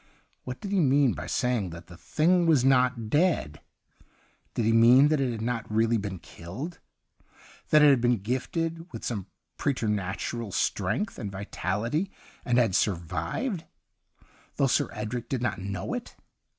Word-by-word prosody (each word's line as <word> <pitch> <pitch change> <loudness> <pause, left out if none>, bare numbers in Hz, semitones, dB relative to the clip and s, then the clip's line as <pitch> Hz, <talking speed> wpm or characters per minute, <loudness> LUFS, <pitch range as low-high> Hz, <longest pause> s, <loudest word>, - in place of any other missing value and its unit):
What 125 0 -6
did 200 - -6
he 200 - +2
mean 140 - +4
by 90 0 -6
saying 120 0 0
that 85 0 -10
the 90 - -13
thing 170 - +2
was 145 -6 +4
not 125 -4 +2
dead? 150 - +1 0.9
Did 115 - 0
he 115 - +3
mean 125 +5 +7
that 155 -2 +2
it 130 -2 +1
had 110 -1 -4
not 115 -2 -3
really 115 +2 +2
been 100 -2 -4
killed, 100 - -8 0.9
that 150 -1 +6
it 150 - +8
had 130 -4 +3
been 120 0 +3
gifted 165 - -3
with - - -7
some 105 -6 -3 0.3
preter 130 -5 0
natural 105 +2 -2
strength 200 - -1
and 100 -3 -4
vitality 105 - -2 0.3
and 120 -1 +1
had 115 -6 +3
survived, 95 - -1 0.9
though 140 - +2
Sir 130 - +2
Edrie 110 +3 -4
did 130 -3 -2
not 120 - -1
know 95 -1 -4
it - - -6
120 Hz, 160 wpm, -27 LUFS, 100-145 Hz, 0.9 s, it